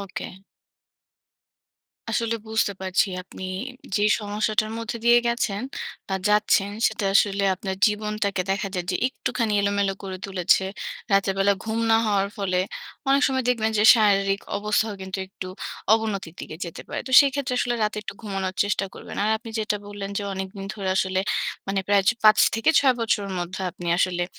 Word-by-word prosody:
ওকে। 195 -2 -6 1.8
আসলে 230 0 0
বুঝতে 220 -2 +1
পারছি 185 +2 +2 0.2
আপনি 185 - -12 0.5
যে 205 - +1 0.2
সমস্যাটার 215 +1 0
মধ্যে 230 +1 -4
দিয়ে 240 0 +7
গেছেন 235 -3 -1 0.5
বা 190 - -1
যাচ্ছেন 210 -1 +3 0.2
সেটা 220 -2 -2
আসলে 200 0 +3
আপনার 190 0 -5
জীবনটাকে 210 -2 -1
দেখা 195 +1 -1
যায় 180 -1 -3
যে 180 - 0
একটুখানি 230 -4 -2
এলোমেলো 200 -1 +1
করে 190 -1 -6
তুলেছে। 190 0 +2 0.5
রাতের 195 -1 +3
বেলা 200 +1 +4
ঘুম 220 +1 -2
না 225 - +6
হওয়ার 200 -1 +1
ফলে 185 -3 0 0.5
অনেক 275 +1 +4
সময় 260 -1 -1
দেখবেন 220 -3 +1
যে 210 - +3
শারীরিক 200 -3 +3 0.2
অবস্থাও 210 +1 0
কিন্তু 190 +1 -5
একটু 185 -1 -8 0.4
অবনতির 200 -6 0
দিকে 155 - -7
যেতে 170 - -8
পারে। - - -3
তো - - -6
সেক্ষেত্রে 275 -2 0
আসলে 240 0 0
রাতে 210 0 0
একটু 200 - -7
ঘুমানোর 195 -3 -3
চেষ্টা 200 -1 0
করবেন। - - -9
আর 215 - +2
আপনি 225 0 -10
যেটা 210 -1 0
বললেন 205 -1 -6
যে - - -3
অনেকদিন 190 +1 -6
ধরে 195 -3 -4
আসলে 190 0 +1 0.5
মানে 195 0 0
প্রায় 200 -1 +4
চ - - +8
৫ 215 0 +7 0.2
থেকে 225 +8 +3
৬ 265 -2 +4
বছরের 210 -4 0
মধ্যে 175 +2 -4
আপনি 175 +1 -9
আসলে 175 -1 +1
205 Hz, 165 wpm, -24 LUFS, 195-220 Hz, 1.8 s, চ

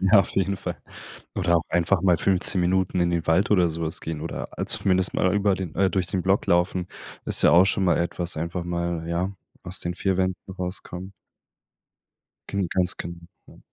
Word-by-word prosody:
Ja, 100 +2 +6
auf 95 - -3
jeden 100 +1 0
Fall. 90 -2 -5 0.6
Oder 85 0 +2
auch 80 - 0
einfach 85 +2 +1
mal 90 -3 +4
15 95 +2 +3
Minuten 90 +1 +1
in 85 0 +2
den 85 -1 -2
Wald 85 +5 +2
oder 90 -5 +3
so 85 +1 -5
was 80 +1 -2
gehen 80 -2 -5
oder 80 - -5
a - - -2
zumindest 95 -1 +2
mal 95 +1 +1
über 100 -1 +2
den 95 -4 -6
äh, 95 +1 +2
durch 95 -3 -1
den 90 +2 -2
Block 95 +2 +1
laufen, 90 +1 +1 0.4
ist - - +5
ja - - +6
auch 90 +2 +7
schon 95 0 +1
mal 85 -3 +2
etwas 85 0 -2
einfach 85 +2 -3
mal, 85 -1 -3
ja, 85 +3 -1 0.3
aus 90 +1 -2
den 90 +1 -3
4 95 +1 -1
Wänden 95 -1 0 0.2
rauskommen. 90 +1 -6 1.4
Gen 100 -2 -1
ganz 90 -1 +1
genau. 85 0 -7 0.3
Ja. - - -17
90 Hz, 200 wpm, -24 LUFS, 85-95 Hz, 1.4 s, auch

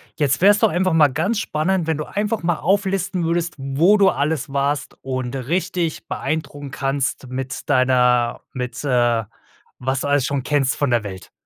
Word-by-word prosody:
Jetzt 145 -2 +1
wär's 205 +1 +6
doch - - +3
einfach 180 +1 +1
mal 150 -3 +5
ganz 180 - -1
spannend, 175 0 0
wenn 160 -2 0
du 155 - -4
einfach 210 +2 -2
mal 170 -1 +1
auflisten 190 -1 0
würdest, 170 0 0
wo 145 +10 +3
du 195 -1 +5
alles 145 -3 -1
warst, 140 +1 -1
und 130 -1 -3
richtig 170 +4 -2
beeindrucken 145 -3 -4
kannst 135 0 -2
mit 130 +2 -5
deiner 125 -3 +3
mit 125 +2 -5
äh, 120 -4 +2 0.5
was 130 +1 -1
du - - -2
alles 145 -2 +2
schon 140 -1 -1
kennst 140 -1 +1
von 145 - 0
der 120 -2 +2
Welt. 95 -2 -8
145 Hz, 175 wpm, -21 LUFS, 130-170 Hz, 0.5 s, wär's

